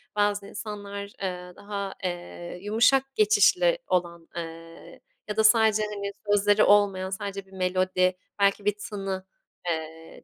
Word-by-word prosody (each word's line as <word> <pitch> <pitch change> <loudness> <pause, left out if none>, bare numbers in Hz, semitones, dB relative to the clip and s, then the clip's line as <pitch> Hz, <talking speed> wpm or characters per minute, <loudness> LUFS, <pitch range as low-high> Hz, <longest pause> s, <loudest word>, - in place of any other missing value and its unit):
bazı 205 -1 +1
insanlar, 205 -1 -6 0.2
eee, 180 -1 -4
daha, 200 -1 -5
eee, 175 0 -5
yumuşak 245 +6 +2
geçişli 440 +4 +4
olan, 170 -2 -1
eee, 165 0 -9 0.3
ya 210 - -4
da 220 - +4
sadece, 220 -1 +5
hani, 200 -1 -4 0.2
sözleri 205 +1 +4
olmayan, 200 -2 +4
sadece 195 0 -5
bir 190 - -23
melodi, 185 0 +1 0.2
belki 200 0 +2
bir 205 -1 +2
tını, 195 -2 -4 0.4
eee, 160 0 -5
200 Hz, 130 wpm, -26 LUFS, 180-210 Hz, 0.4 s, sadece